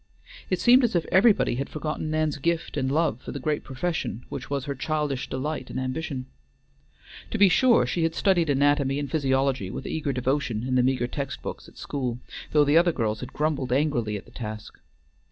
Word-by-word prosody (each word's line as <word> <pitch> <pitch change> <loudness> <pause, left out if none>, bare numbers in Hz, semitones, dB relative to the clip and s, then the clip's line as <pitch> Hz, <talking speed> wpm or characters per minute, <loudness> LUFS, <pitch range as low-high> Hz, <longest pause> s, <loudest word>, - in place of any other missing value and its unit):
It 185 - 0
seemed 250 +2 +6
as 230 -5 +1
if 170 - +1
everybody 195 - +4
had 135 - -3
forgotten 155 0 -3
Nan's 155 -1 0
gift 170 +3 -1
and 135 -2 0
love 150 -5 +1
for - - -7
the 140 - -5
great 150 +2 -1
profession 135 -4 -3
which 125 - -6
was 140 -1 -2
her 140 - -2
childish 145 -1 -2
delight 130 0 -3
and - - -4
ambition. 130 0 -3 1.0
To - - -2
be 200 -2 +6
sure 245 +5 +4
she 175 - -1
had 165 0 0
studied 175 -5 +2
anatomy 140 0 +2
and 145 -1 -4
physiology 135 - +1
with - - -6
eager 150 -3 -2
devotion 130 -2 -1
in 130 - -1
the 130 - +4
meagre 130 -1 +1
text 140 +1 -5
books - - -6
at - - -17
school, 125 -4 -3 0.3
though 150 -1 +5
the 145 +3 +4
other 175 0 +3
girls 110 -7 -1
had 125 0 -7
grumbled 145 -4 -1
angrily 125 -6 +1
at 100 - -10
the - - -18
task. 110 -2 -7
140 Hz, 200 wpm, -26 LUFS, 130-160 Hz, 1.0 s, seemed